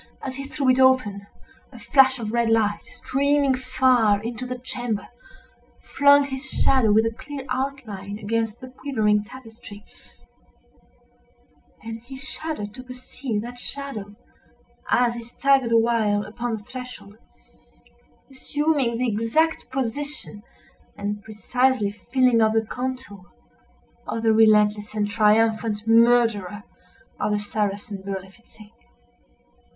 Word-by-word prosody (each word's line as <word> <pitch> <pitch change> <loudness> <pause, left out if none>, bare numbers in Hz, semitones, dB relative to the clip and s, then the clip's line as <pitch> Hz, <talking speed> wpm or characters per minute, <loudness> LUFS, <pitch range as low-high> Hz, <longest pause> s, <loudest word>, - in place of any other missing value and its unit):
As 260 -1 -5
he 275 - -5
threw 275 -1 -3
it 255 0 +4
open, 255 -7 +3 0.4
a - - -12
flash 265 -1 +4
of 220 -3 -4
red 235 -1 +2
light, 215 -2 +2
streaming 280 0 +1
far 250 -5 +2
into 240 +2 -5
the 250 0 -4
chamber, 245 -3 -4 0.7
flung 285 0 +4
his 265 -1 -5
shadow 260 -6 +3
with 220 +2 +4
a 225 - -1
clear 270 +3 -8
outline 250 -7 -4
against 225 +1 -2
the 255 - -9
quivering 215 -6 0
tapestry, 225 -2 -13 2.0
and 225 0 -7
he 255 +3 -11
shuddered 285 -6 -6
to 255 - -9
perceive 250 -2 -5
that 245 +1 -8
shadow—as 240 -1 -4
he 235 - -6
staggered 260 +1 +1
awhile 225 -3 +2
upon 235 +2 -4
the 215 -2 -5
threshold—assuming 230 - -5
the 250 +1 0
exact 230 +9 0
position, 265 -2 -4 0.6
and 205 0 -4
precisely 220 +1 0
filling 245 +2 +2
up 220 0 +3
the 225 0 +1
contour, 250 -7 -6 0.8
of 225 - -3
the 225 -1 +4
relentless 210 -1 +3
and 205 -1 0
triumphant 220 0 +2
murderer 225 -4 +3 0.6
of 210 - 0
the - - +1
Saracen 205 -1 -3
Berlifitzing. 195 +3 -9
230 Hz, 115 wpm, -23 LUFS, 210-260 Hz, 2.0 s, it